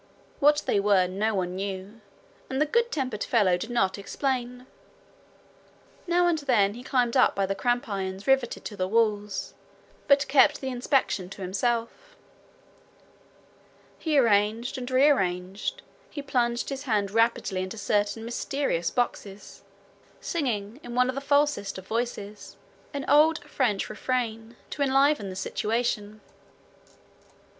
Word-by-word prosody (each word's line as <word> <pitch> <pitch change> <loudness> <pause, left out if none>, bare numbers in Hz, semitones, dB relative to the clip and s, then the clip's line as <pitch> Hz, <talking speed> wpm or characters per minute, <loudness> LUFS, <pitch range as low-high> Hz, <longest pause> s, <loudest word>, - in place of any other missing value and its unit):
What 295 +1 +4
they 200 - +2
were 200 -2 +3
no 205 +4 -1
one 180 -1 -2
knew, 195 +3 -6 0.5
and 265 - -2
the 305 - +4
good 470 +9 +1
tempered 255 -7 -2
fellow 205 -7 +3
did 200 +6 -5
not 200 -5 0
explain. 250 +2 -3 1.4
Now 350 +1 +3
and 340 -2 +2
then 230 -8 +2
he 240 - -9
climbed 250 -2 0
up 255 - +4
by 195 - +1
cramp 245 +4 0
irons 195 -1 -4
riveted 270 -3 +1
to 210 - -6
the 185 -2 -1
walls, 210 -1 0 0.5
but 280 0 +4
kept 270 0 +4
the 265 - -4
inspection 245 -7 0
to 195 0 -8
himself. 235 - -2 1.8
He 310 -3 0
arranged 225 0 +2
and 250 0 -6
rearranged, 195 -9 +1 0.3
he 285 - -7
plunged 240 -3 0
his 275 0 -5
hand 205 -5 0
rapidly 225 -4 +1
into 185 +4 -5
certain 205 +2 0
mysterious 235 -7 -1
boxes, 205 -5 -4 0.6
singing 235 -7 -3
in 240 -3 -8
one 250 0 +3
of - - -1
the 275 - -3
falsest 285 -8 +1
of 190 - -9
voices 215 -2 -4 0.3
an 280 -2 -4
old 310 +2 +4
French 220 -7 -1
refrain 230 0 -3 0.2
to 290 - -5
enliven 275 -5 +3
the 185 - -7
situation. 215 +1 -2
230 Hz, 135 wpm, -26 LUFS, 200-270 Hz, 1.8 s, What